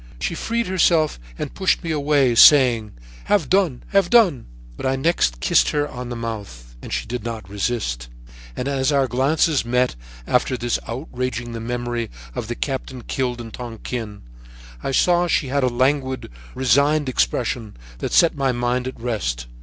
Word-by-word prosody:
"She -, -, -2 dB
freed 230 Hz, +7 st, -1 dB
herself 170 Hz, -, +2 dB, 0.2 s
and -, -, -5 dB
pushed 190 Hz, -1 st, +1 dB
me 165 Hz, -, -2 dB
away, 145 Hz, -4 st, +2 dB
saying: 120 Hz, -4 st, +6 dB, 0.3 s
"'Have 185 Hz, -10 st, +1 dB
done, 180 Hz, -9 st, +2 dB
have 195 Hz, -3 st, +3 dB
done.' 190 Hz, -, +4 dB, 0.3 s
"But -, -, -3 dB
I 130 Hz, -, +1 dB
next 135 Hz, -, +1 dB
kissed -, -, +3 dB
her 145 Hz, 0 st, 0 dB
on 125 Hz, -3 st, -7 dB
the 120 Hz, -, -4 dB
mouth 100 Hz, -, -7 dB
and -, -, -9 dB
she -, -, -2 dB
did 120 Hz, 0 st, -5 dB
not 115 Hz, -4 st, -5 dB
resist, 100 Hz, -, -2 dB, 0.5 s
and 125 Hz, -, -3 dB
as 135 Hz, 0 st, +1 dB
our 140 Hz, -2 st, +2 dB
glances 140 Hz, +4 st, +2 dB
met 125 Hz, -, +1 dB, 0.3 s
after 125 Hz, -, +1 dB
thus 120 Hz, 0 st, -1 dB
outraging 120 Hz, -2 st, -4 dB
the 115 Hz, -, -5 dB
memory 120 Hz, 0 st, -3 dB, 0.2 s
of 110 Hz, -, -4 dB
the 120 Hz, -, -3 dB
captain 130 Hz, -2 st, -4 dB
killed 125 Hz, -2 st, -2 dB
in 115 Hz, -1 st, -8 dB
Tonquin, 115 Hz, -2 st, -6 dB, 0.6 s
I -, -, -3 dB
saw 175 Hz, +6 st, +3 dB
that 175 Hz, -, 0 dB
she 140 Hz, -, +1 dB
had 140 Hz, +1 st, +1 dB
a -, -, +4 dB
languid, 130 Hz, -, 0 dB, 0.2 s
resigned 140 Hz, +4 st, +3 dB
expression 120 Hz, -, -1 dB, 0.2 s
that -, -, -3 dB
set 170 Hz, -, +5 dB
my 135 Hz, -2 st, +1 dB
mind 125 Hz, +1 st, -1 dB
at 130 Hz, -, -7 dB
rest. 100 Hz, -, -2 dB
125 Hz, 170 wpm, -21 LUFS, 115-145 Hz, 0.6 s, saying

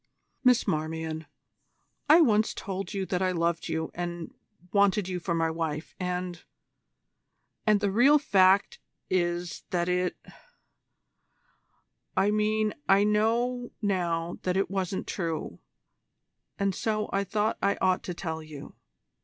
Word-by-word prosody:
"Miss 250 Hz, -2 st, +4 dB
Marmion, 160 Hz, 0 st, -2 dB, 0.8 s
I 320 Hz, +3 st, +8 dB
once 220 Hz, -7 st, +3 dB
told 195 Hz, -1 st, -5 dB
you 195 Hz, -1 st, -2 dB
that 180 Hz, -1 st, -1 dB
I 185 Hz, -1 st, +2 dB
loved 170 Hz, -1 st, 0 dB
you 160 Hz, 0 st, -2 dB
and 175 Hz, -1 st, -5 dB, 0.4 s
wanted 200 Hz, -1 st, +3 dB
you 180 Hz, -1 st, -3 dB
for 170 Hz, 0 st, -2 dB
my 165 Hz, -1 st, +1 dB
wife, 160 Hz, -1 st, -4 dB
and 180 Hz, -1 st, -3 dB, 1.3 s
and 210 Hz, -1 st, +4 dB
the 200 Hz, -1 st, +1 dB
real 260 Hz, +8 st, +6 dB
fact 195 Hz, -8 st, +3 dB, 0.3 s
is 175 Hz, -2 st, -1 dB
that 175 Hz, -1 st, 0 dB
it 180 Hz, 0 st, 0 dB, 2.0 s
I 195 Hz, +2 st, +3 dB
mean 215 Hz, 0 st, +1 dB, 0.2 s
I 195 Hz, +1 st, +6 dB
know 235 Hz, +4 st, +1 dB
now 175 Hz, -4 st, -1 dB
that 185 Hz, 0 st, 0 dB
it 195 Hz, -, 0 dB
wasn't 190 Hz, -1 st, -2 dB
true 165 Hz, -4 st, -4 dB, 1.0 s
and 200 Hz, -1 st, 0 dB
so 215 Hz, +2 st, -1 dB
I 195 Hz, 0 st, +1 dB
thought 210 Hz, +2 st, -1 dB
I 200 Hz, 0 st, +2 dB
ought 185 Hz, -1 st, +2 dB
to 180 Hz, -, -4 dB
tell 160 Hz, -2 st, -4 dB
you. 155 Hz, -3 st, -10 dB
185 Hz, 130 wpm, -28 LUFS, 170-210 Hz, 2.0 s, I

